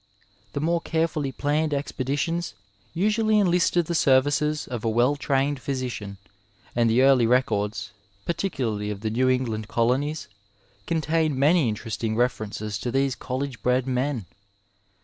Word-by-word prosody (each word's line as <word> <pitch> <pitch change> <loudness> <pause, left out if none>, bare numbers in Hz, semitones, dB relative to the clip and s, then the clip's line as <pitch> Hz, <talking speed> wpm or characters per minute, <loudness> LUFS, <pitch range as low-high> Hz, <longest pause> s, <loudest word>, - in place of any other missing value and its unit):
The - - -2
more 165 +3 +1
oarefolly 160 -4 -1
plamied 150 +1 0
expeditions 140 +1 -2 0.4
usually 215 +4 +2
enlisted 175 -3 +3
the 170 - -3
services 145 +1 +2
of 120 -4 -5
a 115 - +1
well 120 +5 +3
tiained 140 0 0
physician, 125 -7 -4 0.6
and 115 -1 +3
the 120 +4 +4
early 135 -4 +5
records, 110 -4 0 0.3
particularly 125 - -2
of 105 -1 -5
the 110 -1 -2
New 130 +3 +2
England 115 -5 -1
colonies, 135 +8 0 0.6
contain 160 -2 +1
many 145 -1 +4
interesting 110 +1 -3
references 110 -3 -1
to 125 - -3
these 135 +1 +1
coUege 130 0 -4
bred 125 0 +2
men. 130 -3 -1
135 Hz, 130 wpm, -25 LUFS, 115-155 Hz, 0.6 s, early